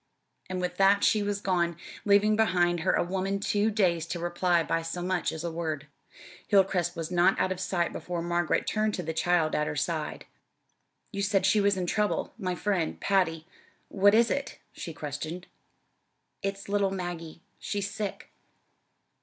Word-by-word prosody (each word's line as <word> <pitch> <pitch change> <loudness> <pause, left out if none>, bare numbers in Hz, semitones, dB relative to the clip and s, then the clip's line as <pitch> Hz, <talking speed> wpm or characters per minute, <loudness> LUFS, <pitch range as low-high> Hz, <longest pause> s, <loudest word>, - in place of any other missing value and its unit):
And 185 0 -2
with 180 0 -3
that 200 +1 +4
she 215 - +4
was 205 0 -1
gone, 170 -4 0 0.3
leaving 205 +1 +4
behind 175 -5 +2
her 180 - +1
a - - +2
woman 190 +2 -2
too 205 +2 +1
dazed 175 -6 +1
to 175 - -4
reply 175 0 +1
by 165 +1 0
so 165 +2 -4
much 185 -1 0
as 160 0 -6
a 170 - -2
word. 160 -3 -3 0.6
Hilcrest 185 -3 +2
was 165 +1 -4
not 180 +2 +3
out 185 - +1
of 185 - -3
sight 175 -2 -1
before 175 -1 -4
Margaret 175 -1 0
turned 215 -1 0
to 180 - -4
the 160 0 -3
child 165 -1 +2
at 150 - +1
her - - -3
side. 155 +2 -2 0.9
"You 200 -3 -3
said 195 -1 +2
she 205 +2 +4
was 200 -1 +2
in 180 - -1
trouble 210 +4 0
my 185 -3 -2
friend, 185 -4 -1
Patty. 165 -5 +1 0.4
What 205 +1 +4
is 235 +1 +4
it?" 280 -1 -2 0.2
she 170 - -6
questioned. 155 +4 -5 1.0
"It's 195 0 -4
little 200 -1 +1
Maggie. 175 -3 -6 0.2
She's 200 -1 -2
sick." 205 -3 -5
180 Hz, 170 wpm, -28 LUFS, 170-200 Hz, 1.0 s, that